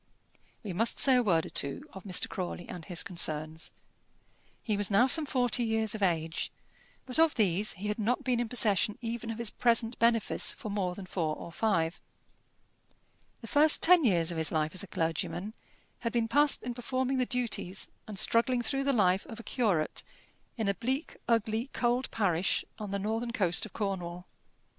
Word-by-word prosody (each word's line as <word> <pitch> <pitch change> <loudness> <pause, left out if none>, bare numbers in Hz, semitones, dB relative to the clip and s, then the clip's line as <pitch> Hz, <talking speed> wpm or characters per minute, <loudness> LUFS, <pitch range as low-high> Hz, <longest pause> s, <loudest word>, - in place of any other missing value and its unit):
We 200 -4 -5
must 225 +6 +1
say 265 -2 +6
a - - +4
word 170 -8 +2
or - - -9
two 140 - -2
of 190 0 -11
Mr. 185 -2 +2
Crawley 175 -1 -5
and 180 -3 -8
his 175 -4 +1
concerns. 160 -3 -2 0.9
He 215 - -1
was 205 -1 0
now 210 +4 +4
some 300 +3 +7
forty 245 -2 +1
years 220 -2 0
of 215 - -6
age, 165 -3 -1 0.5
but 255 +3 -1
of 325 -1 +4
these 205 -1 +1
he 200 +2 -6
had 210 +2 -3
not 245 +6 0
been 250 -3 0
in 240 -2 -2
possession 210 -3 +3
even 230 0 -4
of 225 - -4
his 235 -2 -2
present 230 -1 +1
benefice 230 -1 +3
for 215 - -7
more 185 -3 -2
than 195 - -8
four 165 -4 -2
or 170 - -9
five. 170 -4 -1 1.4
The 230 - -9
first 295 +6 +3
ten 355 -1 +7
years 175 -8 +2
of 165 - -4
his 160 - +2
life 155 -1 -1
as 185 - +2
a 200 - -7
clergyman 170 +5 -3 0.5
had 230 - -3
been 230 -1 0
passed 290 +4 +2
in 245 - -4
performing 260 +2 -2
the 250 - 0
duties 235 -7 -1 0.2
and 210 -2 -7
struggling 240 +4 +2
through 275 +3 -1
the 280 - +2
life 190 -4 +2
of 225 - -9
a - - -9
curate 200 -13 -1 0.6
in 220 -3 -1
a 200 - +2
bleak, 260 - -3
ugly, 230 +2 0
cold 245 +1 0
parish 190 -4 0
on 210 -2 -5
the 200 - -2
northern 225 +4 -3
coast 190 -3 +1
of - - -20
Cornwall. 180 -4 -4
215 Hz, 190 wpm, -30 LUFS, 180-240 Hz, 1.4 s, some